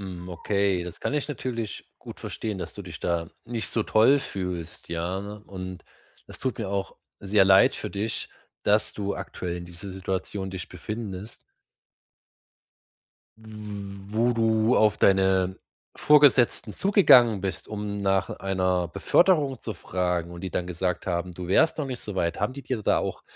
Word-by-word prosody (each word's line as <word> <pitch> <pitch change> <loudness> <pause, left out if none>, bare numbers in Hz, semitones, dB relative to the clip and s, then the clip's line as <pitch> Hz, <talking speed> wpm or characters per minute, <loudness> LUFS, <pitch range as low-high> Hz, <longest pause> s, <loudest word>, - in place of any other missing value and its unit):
Mhm. 90 -2 -7
Okay, 95 0 0
das 90 - -9
kann - - -2
ich 145 -2 0
natürlich 120 -5 -4
gut - - -11
verstehen, 105 -3 -4
dass - - -6
du 100 - -8
dich 85 -3 -9
da 85 -1 -1 0.2
nicht 115 -1 -3
so 115 - 0
toll 115 +7 +4
fühlst. 90 -7 -5
Ja, 85 +3 -2
und 100 -3 -8 0.4
das - - -12
tut 130 -5 -2
mir 105 -4 -3
auch 100 -1 -3 0.2
sehr 100 0 +3
leid 95 0 +6
für - - -5
dich, 105 +2 -3 0.3
dass 105 +1 +2
du 100 -1 -3
aktuell 90 -1 -5
in 85 - -7
dieser 85 +3 -8
Situation 95 +1 -3
dich 95 -2 -6
befindest. 110 -1 -7 2.0
Wo 105 +1 -3
du 115 0 +2
auf 105 -2 +4
deine 95 -1 +3 0.4
Vorgesetzten 140 -6 +5
zugegangen 125 - +5
bist, 95 -1 -4
um 105 -1 -4
nach 95 -1 +1
einer 95 -2 0
Beförderung 140 - +3
zu 110 - -5
fragen 90 -2 -2
und 85 - -8
die 95 - -4
dann 90 - -2
gesagt 90 +1 -2
haben, 90 0 -2
du 90 0 -6
wärst 160 - +3
noch 150 - -1
nicht 125 -3 -5
so 105 -2 -7
weit. 85 -1 -1
Haben 105 +5 0
die 140 +1 -8
dir 125 -5 -2
da - - +3
auch, - - -4
100 Hz, 160 wpm, -26 LUFS, 90-110 Hz, 2.0 s, leid